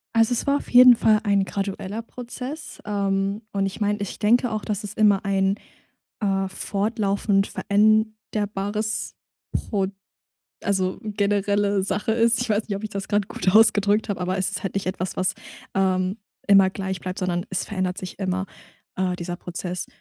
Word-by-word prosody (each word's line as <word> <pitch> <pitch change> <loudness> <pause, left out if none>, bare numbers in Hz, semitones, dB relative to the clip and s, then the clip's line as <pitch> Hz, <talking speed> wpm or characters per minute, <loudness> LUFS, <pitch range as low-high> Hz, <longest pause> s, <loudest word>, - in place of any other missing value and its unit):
Also, 225 +2 +4
es - - -1
war 280 0 +3
auf - - -8
jeden 250 0 +9
Fall 215 -1 +4
ein 200 -2 +2
gradueller 200 +2 -4
Prozess, 250 +5 -8
ähm, 200 0 -1
und 195 -1 +1
ich 195 +2 -4
meine 205 0 0
ich 200 - -5
denke 235 +3 +3
auch, 215 -1 -3
dass 210 0 -2
es 205 0 -5
immer 205 -2 +3
ein, 195 0 +1 0.6
äh, 195 -2 0
fortlaufend 200 0 0
veränderbares 215 0 0 0.4
Prod 195 -3 -1 0.7
also, 190 -2 0
generelle 205 -1 +1
Sache 205 +3 -1
ist. 230 0 +3
Ich 245 - -3
weiß 210 +1 +1
nicht, 200 - -2
ob 200 - -6
ich 215 - -3
das 200 -1 -4
grade 205 -1 +1
gut 185 -3 -1
ausgedrückt 215 -1 +4
habe, 190 -2 -2
aber 185 +1 -1
es 190 0 +1
ist 200 - -4
halt 195 - -4
nicht 195 - -1
etwas, 185 0 -3
was, 185 - +1 0.4
ähm, 190 +1 +1 0.3
immer 195 -1 +7
gleich 190 -1 -4
bleibt, 185 0 -5
sondern 180 -1 -1
es 190 - -1
verändert 185 -2 -2
sich 185 +2 -7
immer, 185 0 -1 0.5
äh, 185 -1 0
dieser 175 0 -5
Prozess. 180 0 -5
200 Hz, 170 wpm, -24 LUFS, 190-215 Hz, 0.7 s, jeden